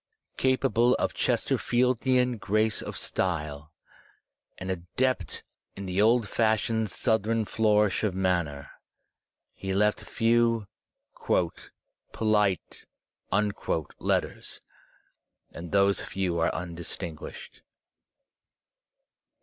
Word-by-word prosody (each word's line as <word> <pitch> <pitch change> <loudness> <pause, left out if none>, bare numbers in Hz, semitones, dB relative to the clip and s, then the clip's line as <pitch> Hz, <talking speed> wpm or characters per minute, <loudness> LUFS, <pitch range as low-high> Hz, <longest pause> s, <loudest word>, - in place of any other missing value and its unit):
Capable 130 -2 +3
of - - -1
Chesterfieldian 125 0 +1
grace 110 0 +1
of - - -6
style, 75 -4 -2 0.9
and 95 0 -4
adept 95 +9 -2 0.3
in 100 - -6
the 95 +2 0
old 115 0 +4
fashioned 110 0 +1
Southern 110 +1 +1
flourish 105 -2 +2
of 100 -4 0
manner, 85 -7 -1 0.8
he 95 0 -4
left 105 +1 +2
few 115 0 +2 0.5
"poUte" 85 -2 -1 2.3
letters, - - -2 0.9
and 85 0 -8
those 100 0 +3
few 90 -3 -2
are 80 - +3
undistinguished. 85 -2 -7
105 Hz, 80 wpm, -27 LUFS, 90-115 Hz, 2.3 s, old